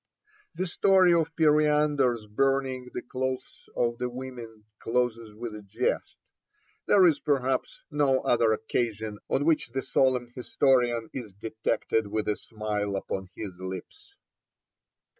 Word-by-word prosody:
The 185 - -1
story 185 0 +4
of 165 -1 +1
Periander's 150 -6 +3
burning 130 +2 0
the 125 - -5
clothes 130 +1 -4
of 120 -1 0
the 125 - -1
women 120 -4 -8
closes 115 -2 -1
with 115 0 -6
a 105 - -8
jest; 100 -2 -2 0.7
there 195 -3 +6
is, 155 -5 +4
perhaps, 135 -2 -1
no 140 -3 +2
other 115 -2 +3
occasion 110 -1 -2
on 145 - +1
which 160 -6 +2
the 135 +3 -3
solemn 125 -2 +1
historian 120 -3 +1
is 115 -7 -6
detected 110 +1 -1
with 105 +1 -2
a 105 - +1
smile 105 -2 -3
upon 95 -1 -4
his 105 -3 -5
lips. 95 - -8
125 Hz, 130 wpm, -27 LUFS, 110-135 Hz, 0.7 s, there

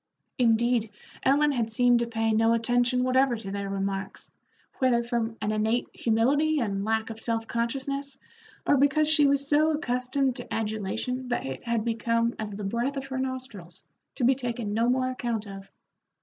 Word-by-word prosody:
Indeed, 235 -1 +2 0.3
Ellen 290 +2 +3
had 230 -4 -1
seemed 245 +1 +4
to 235 - -1
pay 225 -1 0
no 225 +1 +3
attention 245 +2 +2
whatever 255 0 +3
to 210 -4 -7
their 200 0 -4
remarks, 195 0 -4 0.5
whether 245 -2 +3
from 235 -1 -2
an 210 - 0
innate 220 +3 0
humility 285 +8 +2
and 200 -5 -1
lack 220 +1 -1
of 225 - -8
self 225 0 -1
consciousness, 270 +4 -3 0.5
or 285 - +4
because 285 +3 +3
she 305 -2 +5
was 280 0 +1
so 305 +2 +4
accustomed 255 -1 0
to 245 - -9
adulation 225 +4 -2
that 245 - -2
it 135 -1 -6
had 235 -2 -1
become 230 0 0
as 215 -1 -3
the 205 0 -7
breath 235 +8 -1
of 270 - -4
her 265 -1 -4
nostrils, 255 -10 -6 0.3
to 265 - -3
be 255 +3 +5
taken 240 -5 -4
no 230 +2 +2
more 255 0 +1
account 235 -4 -3
of. 195 -1 -10
235 Hz, 175 wpm, -27 LUFS, 220-260 Hz, 0.5 s, she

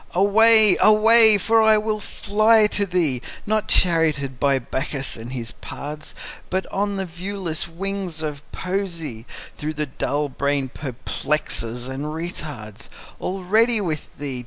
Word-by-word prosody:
Away! 215 +2 +6
away! 220 0 +7
for 225 +3 +2
I 220 -1 +5
will 215 0 -2
fly 215 +2 +2
to 205 -1 0
thee, 165 -9 0 0.2
Not 215 0 -1
charioted 155 -7 +2
by 140 -1 +2
Bacchus 135 +2 -4
and 115 +2 -9
his 120 -3 -5
pards, 150 +5 -9 0.3
But 190 +1 -2
on 200 +1 -1
the 190 - -3
viewless 175 -1 -4
wings 180 -1 -5
of 150 -2 -5
Poesy, 170 - -5 0.3
Though 150 +1 -4
the 150 0 -3
dull 145 +1 -2
brain 140 0 -2
perplexes 125 -2 -4
and 135 +2 -5
retards: 150 - -7 0.3
Already 215 +5 +1
with 160 -7 -3
thee! 135 -3 -5
170 Hz, 135 wpm, -22 LUFS, 140-205 Hz, 0.3 s, away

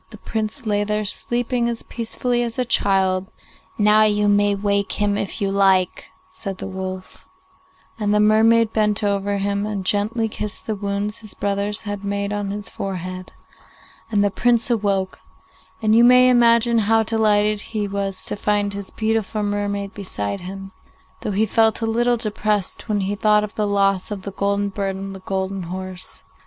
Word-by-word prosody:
the - - -11
Prince 220 +3 -4
lay 205 -1 +1
there 210 0 -1
sleeping 240 +3 -1
as 235 -1 -5
peacefully 240 +1 -2
as 235 -1 -3
a 255 - 0
child. 190 -4 +2 0.5
'Now 210 0 +5
you 210 -1 +3
may 205 0 +3
wake 200 0 0
him 205 -1 0
if 200 +1 -3
you 200 -2 0
like,' 190 -2 +2 0.2
said 185 +1 -4
the - - -6
wolf, 185 -1 -7 0.7
and 205 -1 0
the 210 - +3
mermaid 220 +1 +4
bent 210 -1 +1
over 200 0 0
him 200 0 -1
and 200 -3 -4
gently 215 +4 +1
kissed 210 -1 -5
the 220 - -1
wounds 200 +1 -3
his 215 -3 -10
brothers 200 +1 -2
had 205 -1 -5
made 200 0 -2
on 205 -1 -2
his 205 +1 -4
forehead, 185 -1 -5 0.8
and 205 -2 +2
the 205 - +1
Prince 235 +3 +2
awoke, 200 -4 0 0.6
and 215 0 +4
you 235 - +6
may 250 +1 +7
imagine 235 -1 +4
how 225 +1 +3
delighted 210 -1 +2
he 215 -2 -3
was 195 -1 -1
to - - -1
find 205 -1 0
his 200 -1 -5
beautiful 220 -1 -1
mermaid 205 -1 -2
beside 100 - -4
him, 195 +1 -8 0.5
though - - -3
he 210 +2 +2
felt 220 0 +2
a 225 - -1
little 240 +2 +1
depressed 215 -2 -2
when 205 -1 +1
he 195 +1 -1
thought 210 0 +3
of 210 - -5
the 210 -1 -1
loss 195 -2 +1
of 205 -3 -5
the 200 - -5
golden 200 +1 0
bird 195 -1 -3
and 195 0 -6
the - - -8
golden 190 0 -3
horse. 185 +1 -3
205 Hz, 175 wpm, -21 LUFS, 195-220 Hz, 0.8 s, may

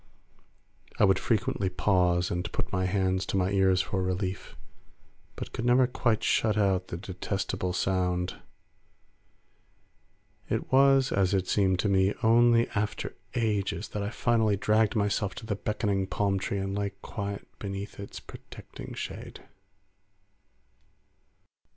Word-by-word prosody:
I - - +5
would 95 -1 +3
frequently 100 -4 0
pause 90 -2 +2
and 90 0 -3
put - - -4
my 95 0 +1
hands 95 0 +1
to - - -1
my 95 +1 +1
ears 95 -2 +3
for 95 - -2
relief, 95 +1 -3 0.8
but - - -7
could 115 - -4
never 125 +1 +5
quite 120 -3 0
shut 110 -1 +2
out 95 -3 +2
the 85 - -5
detestable 95 0 -3
sound. 90 -1 -1 2.1
It - - -2
was, 135 0 +5
as 95 0 +2
it 95 -1 0
seemed 95 -2 +2
to - - 0
me, 95 0 +2
only 115 +1 +5
after 105 -1 -3 0.2
ages 105 -3 -1
that 105 - -4
I 100 - -2
finally 110 -3 +1
dragged 105 +2 +2
myself 100 -2 0
to - - -8
the 105 - -2
beckoning 100 -2 -1
palm 100 0 0
tree 100 - -2
and 95 0 -2
lay 100 -1 -2
quiet 100 0 -5
beneath 100 0 -6
its 100 - -7
protecting - - -11
shade. - - -7
100 Hz, 135 wpm, -28 LUFS, 95-105 Hz, 2.1 s, I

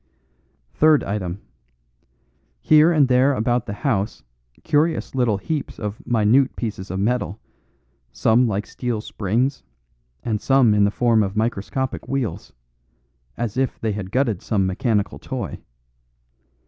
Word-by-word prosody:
"Third 155 -1 +4
item. 100 -2 -4 1.2
Here 155 +2 +6
and 150 -5 +4
there 130 +2 +3
about 120 +1 0
the 100 - -3
house 105 - -1 0.4
curious 155 +3 +1
little 120 -6 +1
heaps 145 +9 -4
of 105 0 -5
minute 120 +3 +3
pieces 100 -5 -5
of 95 +2 -3
metal, 110 -2 -1 0.7
some 120 +3 +3
like 105 -1 -2
steel 120 -4 -3
springs 115 +8 -1 0.6
and 110 -3 -2
some 135 -5 +4
in 105 -1 +4
the - - +3
form 115 +1 +2
of 100 0 -2
microscopic 120 +4 -2
wheels. 135 -5 -3 0.9
As 120 -1 -3
if 135 -1 -1
they 110 - -1
had 100 -2 -5
gutted 115 -4 0
some 100 -4 0
mechanical 105 +2 -1
toy. - - -5
115 Hz, 130 wpm, -22 LUFS, 105-130 Hz, 1.2 s, Here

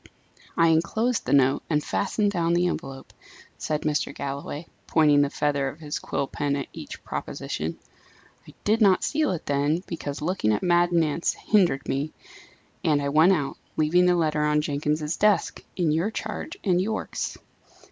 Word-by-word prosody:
"I 165 0 +5
enclosed 220 +9 +1
the - - -1
note, 135 -1 +4
and 150 -2 +1
fastened 205 +1 0
down 170 -3 +1
the 175 +1 +2
envelope," 135 -6 -4 0.5
said 150 -1 -2
Mr. 150 -2 0
Galloway, 140 +3 -5 0.2
pointing 150 -3 +4
the 145 - +2
feather 145 -2 0
of 150 - -11
his 150 -2 -4
quill - - -2
pen 140 +1 -2
at 140 -2 -3
each - - -9
proposition. - - -4 0.7
"I - - -14
did 220 +2 +2
not 195 -3 +5
seal 305 0 +1
it 175 - -3
then, 145 +5 0
because 145 -4 -5
looking 150 - 0
at - - -2
Mad 175 0 +3
Nance 165 -1 +1
hindered 180 -10 +1
me, 140 +3 -1 0.7
and 150 -2 +3
I 140 0 -1
went 160 +6 +5
out, 145 -6 -2 0.2
leaving 175 +4 +4
the 180 - +4
letter 155 -3 +1
on 150 0 +2
Jenkins's 150 +1 -1
desk, 210 -1 +2
in 170 -4 +1
your 165 +7 +1
charge 220 -1 -5
and 180 -2 +2
Yorke's." 220 +3 -3
155 Hz, 165 wpm, -25 LUFS, 145-180 Hz, 0.7 s, I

